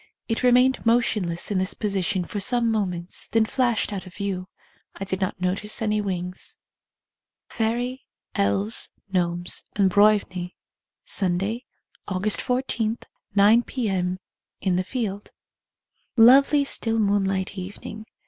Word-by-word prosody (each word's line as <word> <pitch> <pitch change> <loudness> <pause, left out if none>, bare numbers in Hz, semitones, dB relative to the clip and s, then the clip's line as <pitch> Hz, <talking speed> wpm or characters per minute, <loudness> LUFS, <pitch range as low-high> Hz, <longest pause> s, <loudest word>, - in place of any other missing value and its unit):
It 225 - -1
re 250 - +5
mained 250 +2 +4
motionless 215 -7 +1
in 195 - +1
this 185 +1 -1
position 195 -3 -1
for 205 - -4
some 235 +3 +2
moments, 180 -5 -2
then 225 -1 +2
flashed 240 -3 0
out 190 -2 -5
of 175 - -13
view. 195 -3 -3 0.5
I 195 - -5
did 190 0 -3
not 190 - -2
notice 190 +4 -1
any 210 -1 +1
wings. 180 -2 -5 0.9
Fairy, 245 +4 -2 0.3
Elves, 100 +2 +1 0.2
Gnomes, 175 -1 0
and 195 -2 +3
Broivnie. 195 -3 +2 0.5
(Sunday, 195 +6 -1 0.4
j^^.igust 200 +2 +1
14, 245 -3 -1 0.4
9 210 +4 +6
p.m. 190 -8 -2 0.4
In 185 -2 0
the 185 - +1
field.) 205 -2 -4 0.9
Lov^^.y 275 +5 +7
still 225 -4 0
moonlight 195 -2 +1
evening. 205 +3 -8
205 Hz, 125 wpm, -24 LUFS, 185-225 Hz, 0.9 s, Lov^^.y